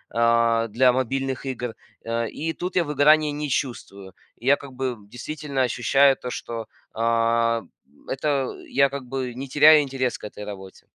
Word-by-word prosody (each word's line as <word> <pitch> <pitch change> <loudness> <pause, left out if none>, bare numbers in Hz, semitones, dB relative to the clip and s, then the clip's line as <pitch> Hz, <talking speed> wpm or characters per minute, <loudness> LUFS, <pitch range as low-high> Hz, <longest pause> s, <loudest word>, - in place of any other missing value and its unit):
а, 115 0 +3
для 125 +3 +3
мобильных 135 +1 -2
игр, 125 -3 -4 0.3
э. 115 0 -2
И 160 +1 -4
тут 180 +2 -5
я 180 - +3
выгорания 150 0 +4
не 145 0 -4
чувствую, 100 -8 -4 0.2
я 135 +4 +3
как 140 -2 -11
бы 130 -1 -2
действительно 140 +3 -3
ощущаю 135 +3 +3
то, 125 - -6
что, 115 -2 -6 0.3
а, 115 0 +1 0.4
это 135 -1 -1
я 140 0 +3
как 140 -2 -6
бы 130 -1 -4
не 135 +3 -6
теряю 150 +3 +7
интерес 130 -3 -2
к - - -22
этой 105 0 -8
работе. 95 -2 -10
130 Hz, 160 wpm, -24 LUFS, 115-140 Hz, 0.4 s, теряю